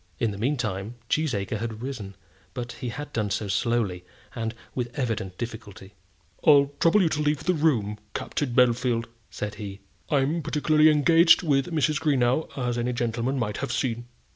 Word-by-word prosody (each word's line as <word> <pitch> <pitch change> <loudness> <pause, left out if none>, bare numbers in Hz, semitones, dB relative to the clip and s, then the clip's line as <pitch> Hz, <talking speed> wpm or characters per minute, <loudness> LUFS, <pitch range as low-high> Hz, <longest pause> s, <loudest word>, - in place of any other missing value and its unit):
In 115 -3 0
the 100 - -7
meantime 115 -4 -2
Cheesacre 110 -9 0
had 115 0 -5
risen; 110 -8 -6 0.4
but 120 -1 -4
he 120 +1 -5
had 145 +5 -7
done 105 -3 -1
so 105 +1 -2
slowly, 100 -2 0 0.3
and 115 -1 -3 0.2
with 120 -2 -2
evident 110 -8 -2
difficulty. 110 -4 -8 0.5
"I'll 140 -2 +5
trouble 180 +4 +4
you 165 - +3
to 150 - -1
leave 150 -1 0
the 180 - +2
room, 120 - +1 0.2
Captain 145 -4 -2
Bellfield," 120 -1 +2 0.2
said 105 0 -5
he. 100 -1 -6 0.3
"I'm 145 +3 +1
particularly 155 +1 +3
engaged 165 +4 +5
with 140 -1 +1
Mrs. 155 -2 +1
Greenow, 140 -1 +2
as 120 -2 -1
any 125 +1 -1
gentleman 120 +3 -1
might 105 -4 -2
have - - -3
seen." 120 -1 -1
120 Hz, 165 wpm, -26 LUFS, 110-145 Hz, 0.5 s, I'll